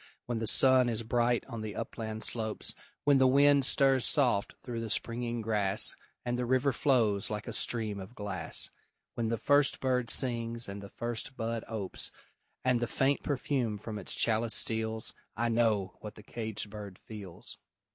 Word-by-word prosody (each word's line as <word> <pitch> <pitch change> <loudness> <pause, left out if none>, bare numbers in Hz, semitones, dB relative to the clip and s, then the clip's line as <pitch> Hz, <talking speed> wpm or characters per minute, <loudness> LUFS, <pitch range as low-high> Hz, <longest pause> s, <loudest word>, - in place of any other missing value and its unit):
When 120 -2 -2
the 115 - -2
sun 130 0 +5
is 115 -1 -2
bright 120 +1 +1
on 115 -4 -6
the 110 -1 -5
upland 110 -1 -5
slopes; 110 -2 -1 0.3
When 140 -2 +5
the 130 - +6
wind 140 +1 +5
stirs 135 -2 +4
soft 125 -9 +2
through 120 -2 -4
the 115 - -4
springing 120 +1 -1
grass, 105 -1 +1 0.3
And 120 0 -1
the 125 - 0
river 130 +2 +3
flows 115 -7 +2
like 105 -1 -4
a - - -4
stream 110 -4 -1
of 95 +6 -9
glass; 105 -2 -2 0.4
When 115 -1 -1
the 115 +1 0
first 145 +3 +3
bird 125 -3 0
sings 115 -2 +1
and 100 0 -6
the 100 - -9
first 120 +5 -4
bud 115 0 -2
opes, 105 -4 -1 0.5
And 125 -2 +3
the 120 - -1
faint 135 +4 +1
perfume 130 -6 -1
from 105 +1 -6
its 95 - -3
chalice 115 0 +2
steals 110 0 -1 0.2
I 120 +1 +1
know 110 -5 +1
what 105 0 -8
the 105 - -13
caged 110 -2 -4
bird 100 -3 -8
feels! 100 -5 -9
115 Hz, 175 wpm, -31 LUFS, 110-125 Hz, 0.5 s, the